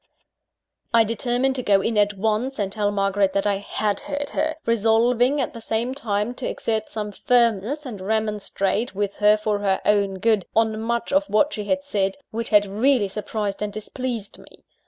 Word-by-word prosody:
I 230 - +7
determined 245 +4 0
to - - -1
go 200 -4 +3
in 225 +3 -1
at 205 0 +2
once, 220 +6 -1
and 200 -2 -1
tell 205 0 0
Margaret 195 -1 +1
that 200 - 0
I 200 -1 +2
had 205 0 -2
heard 285 0 -4
her 315 +1 -1
resolving, 235 +4 +3
at 265 - -2
the 230 - -9
same 225 +3 -1
time, 215 -4 -2
to 260 - -3
exert 220 -1 -2
some 210 -1 -4
firmness, 235 +5 +1
and 220 -7 -7
remonstrate 210 +1 -1
with 200 0 -2
her, 210 0 +5
for 210 -1 -1
her 195 -2 +1
own 200 -2 +2
good, 210 0 +1
on 220 -1 +2
much 235 +3 -2
of 290 +1 +3
what 290 +5 +2
she 210 -2 -4
had 280 +6 0
said, 195 -8 -1
which 230 +1 -3
had 210 -2 +5
really 215 +2 +2
surprised 210 -1 -4
and 210 0 -2
displeased 220 +1 -5
me. - - -17
215 Hz, 185 wpm, -23 LUFS, 205-240 Hz, -, I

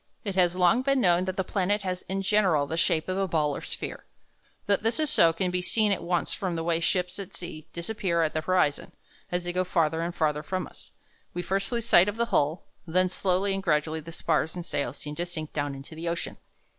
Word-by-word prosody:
It 200 - -2
has 180 -2 +3
long 185 +7 +4
been 275 0 +2
known 180 -4 +3
that 185 0 -3
the 190 - +1
planet 200 +2 0
has 185 -1 -2
in 195 +1 -1
general 185 -7 +3
the 160 - -3
shape 160 -1 +1
of 185 +1 -1
a 195 - +1
ball 150 -4 +1
or - - -5
sphere. - - -5 0.6
That 200 -1 +2
this 225 +7 +1
is 310 -2 +2
so 165 - +6
can 180 +2 -1
be 180 0 0
seen 210 +3 +3
at 195 - 0
once 175 0 0
from 185 -4 -2
the 165 - -2
way 165 0 +1
ships 180 +2 0
at 195 - -8
sea 155 -3 -8
disappear 170 -1 -1
at 155 - 0
the 155 - 0
horizon. 170 -4 +1 0.4
As 180 0 0
they 175 0 -3
go 185 +1 +1
farther 165 -3 +1
and 170 +1 -3
farther 150 -2 +1
from 185 +4 -3
us, - - -10 0.5
we 175 - -2
first 195 +3 -1
lose 235 -2 -1
sight 180 -4 +6
of 205 - -5
the 235 - +2
hull, 150 +4 +2 0.2
and 165 - -8
then 185 0 +4
slowly 190 +1 0
and 195 - -2
gradually 155 -2 +1
the 160 +2 -9
spars 160 -1 0
and 175 -1 -5
sails 140 -5 -2
seem 150 - -7
to 175 - -1
sink 155 -3 -6
down 145 -2 -2
into 135 +3 -10
the 165 +2 -4
ocean. 170 0 -4
175 Hz, 245 wpm, -27 LUFS, 160-190 Hz, 0.6 s, so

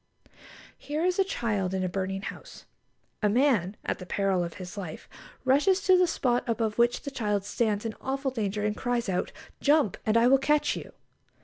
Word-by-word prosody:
Here 305 +4 -2
is 365 +1 +1
a - - +6
child 210 - -1
in 190 - -1
a - - +1
burning 195 +1 -3
house. - - -9 0.6
A 210 - +3
man 215 -5 +2
at - - -2
the 180 - -9
peril 195 -2 +1
of 170 -1 -6
his 180 -1 -8
life 180 -6 -7 0.4
rushes 295 +9 +4
to 375 - +6
the 365 0 +4
spot 245 -6 +1
above 225 -1 -1
which 240 0 +3
the 280 - -5
child 210 -6 -1
stands 210 0 0
in 225 - -2
awful 270 0 -2
danger, 210 -3 -2
and 210 0 0
cries 245 -1 -1
out, 185 -2 -1 0.3
"Jump, 290 - +3
and 220 +1 +2
I 230 - +5
will 265 +2 +6
catch 295 +2 +2
you!" - - -8
225 Hz, 195 wpm, -28 LUFS, 195-270 Hz, 0.6 s, a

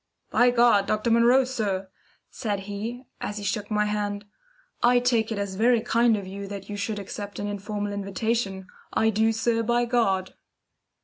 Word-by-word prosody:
"By 245 - +5
God, 235 -5 +4
Dr. 215 +2 0
Munro, 240 +3 +5
sir," 205 -7 -2 0.4
said 205 -5 -3
he, 210 +5 -5 0.2
as 210 - -4
he 205 - -5
shook 205 +1 -2
my 210 -1 +1
hand. 205 -1 -2 0.6
"I 245 +1 +5
take 235 -3 +2
it 220 - -2
as 200 -1 -3
very 235 +4 +3
kind 235 -1 +3
of 200 - -6
you 195 +1 -7
that 200 -1 -7
you - - -3
should 210 +1 -3
accept 205 0 -6
an 205 - -3
informal 205 0 -3
invitation. 200 0 -2 0.3
I 220 0 +2
do, 220 +1 +2
sir, 225 +1 +1
by 240 +1 +1
God!" 195 -6 +1
210 Hz, 175 wpm, -26 LUFS, 200-235 Hz, 0.6 s, By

